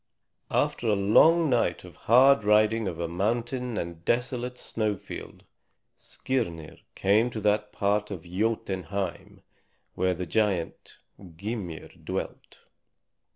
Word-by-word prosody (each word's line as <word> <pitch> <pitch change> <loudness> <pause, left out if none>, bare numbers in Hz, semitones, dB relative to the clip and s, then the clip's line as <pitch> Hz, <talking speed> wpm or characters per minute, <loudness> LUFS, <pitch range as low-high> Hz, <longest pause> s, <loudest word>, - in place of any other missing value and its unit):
After - - 0
a 105 - +3
long 155 +12 +5
night 120 -9 +1
of 90 -3 -13
hard 130 +1 +6
riding 105 +1 +3
over 85 -2 -3
mountain 120 +6 -2
and 85 -2 -5
desolate 125 +3 -1
snowfield, 105 -3 -4 0.5
Skirnir 85 -12 -4 0.2
came 105 +5 +3
to 115 - -5
that 105 0 +1
part 105 +1 0
of 90 -5 -6
Jotunheim 95 -1 -3 0.5
where 95 -1 0
the 90 +1 -4
giant 100 -4 -1 0.4
Gymir 100 -3 -5
dwelt. - - -6
105 Hz, 110 wpm, -27 LUFS, 90-115 Hz, 0.5 s, hard